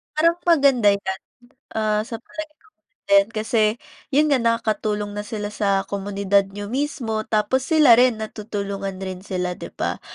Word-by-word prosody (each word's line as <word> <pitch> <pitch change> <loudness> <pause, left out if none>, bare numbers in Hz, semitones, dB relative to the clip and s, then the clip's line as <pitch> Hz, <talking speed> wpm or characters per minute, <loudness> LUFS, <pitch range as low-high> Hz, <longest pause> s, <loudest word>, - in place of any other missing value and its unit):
Parang 335 +2 +3
maganda 275 -9 +5
'yan. 190 -1 -4 0.5
Ah, 215 -1 0
sa 230 0 -7
palagay 310 +5 -8
ko - - -26 0.4
din 200 0 +5
kasi 220 +1 0 0.5
'yon 295 +3 +4
nga 270 - +4
nakakatulong 215 -3 -1
na 205 - -3
sila 210 0 -4
sa 200 -2 +1
komunidad 200 0 0
niyo 205 +1 -6
mismo 255 -5 -2
tapos 230 +5 +1
sila 305 -7 +6
rin 245 -2 +3
natutulungan 200 -3 -5
rin 185 -1 -6
sila, 180 -2 -3
'di - - -9
ba? - - -2
215 Hz, 155 wpm, -22 LUFS, 200-245 Hz, 0.5 s, sila